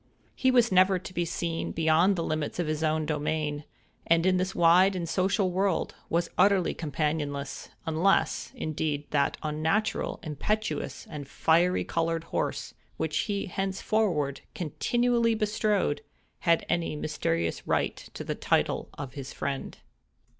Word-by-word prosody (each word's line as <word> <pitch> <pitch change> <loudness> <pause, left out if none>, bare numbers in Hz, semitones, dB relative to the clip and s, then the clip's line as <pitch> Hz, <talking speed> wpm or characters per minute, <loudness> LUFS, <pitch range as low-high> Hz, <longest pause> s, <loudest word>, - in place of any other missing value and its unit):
He 260 - +2
was 245 -3 +4
never 185 +1 +5
to 185 +1 -9
be 175 -1 0
seen 165 0 -2
beyond 165 +4 +3
the 170 - -1
limits 155 -2 -2
of 175 - 0
his 155 0 -2
own 155 0 +1
domain, 150 -1 -2 0.4
and, 165 +1 +4
in 185 -1 +4
this 185 +1 -1
wide 180 +3 +5
and 175 -2 -3
social 190 +2 +1
world, 190 0 0 0.2
was 170 +1 0
utterly 200 -3 +4
companionless—unless, 155 +3 -1
indeed, 150 -2 -2
that 140 -2 +1
unnatural, 160 +8 0
impetuous, 210 +8 -2
and 150 -3 -7
fiery 170 +5 +2
colored 165 0 -1
horse, - - -3 0.2
which 155 -1 -2
he 200 -1 -1
henceforward 190 -6 0
continually 235 - +1
bestrode, 210 -7 +1 0.4
had 170 -2 +2
any 170 -2 0
mysterious 85 - -2
right - - +1 0.2
to - - -5
the - - -2
title - - 0
of 135 -3 -6
his 135 -2 -7
friend. 140 -1 -4
165 Hz, 135 wpm, -28 LUFS, 150-190 Hz, 0.4 s, never